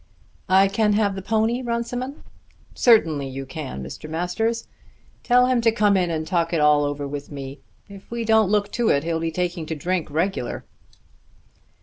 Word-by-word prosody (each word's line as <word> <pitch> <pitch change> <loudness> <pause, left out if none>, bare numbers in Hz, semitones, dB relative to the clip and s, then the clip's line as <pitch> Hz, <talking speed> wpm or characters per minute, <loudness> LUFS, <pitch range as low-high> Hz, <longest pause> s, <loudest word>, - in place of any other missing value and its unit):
"I 190 +1 +6
can 210 +1 +1
have 205 -1 +2
the 195 - -6
pony, 220 +5 0
Runciman?" 245 +3 -4 0.5
"Certainly 160 - +3
you 135 +1 -6
can, 130 - -6
Mr. 70 - -8
Masters. 200 +8 -2 0.5
Tell 250 0 +4
him 250 -1 +2
to 230 -1 +4
come 210 -2 +3
in 180 -2 +1
and 160 -1 -2
talk 170 0 0
it 165 - +2
all 150 -1 +4
over 145 0 -3
with 145 +1 -7
me. 140 0 -7 0.3
If 200 -1 -13
we 235 -1 -3
don't 220 -3 +4
look 205 0 +1
to 240 -2 0
it 140 - +2
he'll 165 0 -1
be 165 0 -1
taking 175 -1 -3
to 160 - -3
drink 175 +2 -2
regular." 160 -4 -2
185 Hz, 180 wpm, -23 LUFS, 155-220 Hz, 0.5 s, I